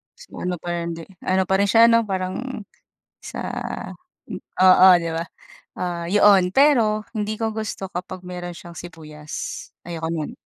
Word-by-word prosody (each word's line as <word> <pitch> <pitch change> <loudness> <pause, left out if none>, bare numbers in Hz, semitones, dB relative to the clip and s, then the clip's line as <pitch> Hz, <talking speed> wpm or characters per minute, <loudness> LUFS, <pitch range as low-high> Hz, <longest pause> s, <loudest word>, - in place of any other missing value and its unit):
Mas - - -15
maano 180 0 -4
pero 175 +1 -3
hindi 165 -1 -5 0.2
ano 190 0 +2
pa 190 - +2
rin 200 +1 +2
siya 230 0 +7
no 230 0 +4
parang, 200 +4 -4 0.5
sa - - -8 1.2
oo 185 0 +7 0.2
di 165 - -3
ba? 165 0 -2 0.5
Ah, 175 -1 -3
yoon 200 -2 +5
pero 225 -4 +3
hindi 215 -1 -2
ko 220 -1 -2
gusto 215 -3 -4
kapag 180 +1 -6
meron 175 -1 -6
siyang 170 +1 -11
sibuyas, 155 -3 -8 0.2
ayoko 165 -2 -4
no'n. 160 -2 -3
185 Hz, 150 wpm, -22 LUFS, 170-215 Hz, 1.2 s, siya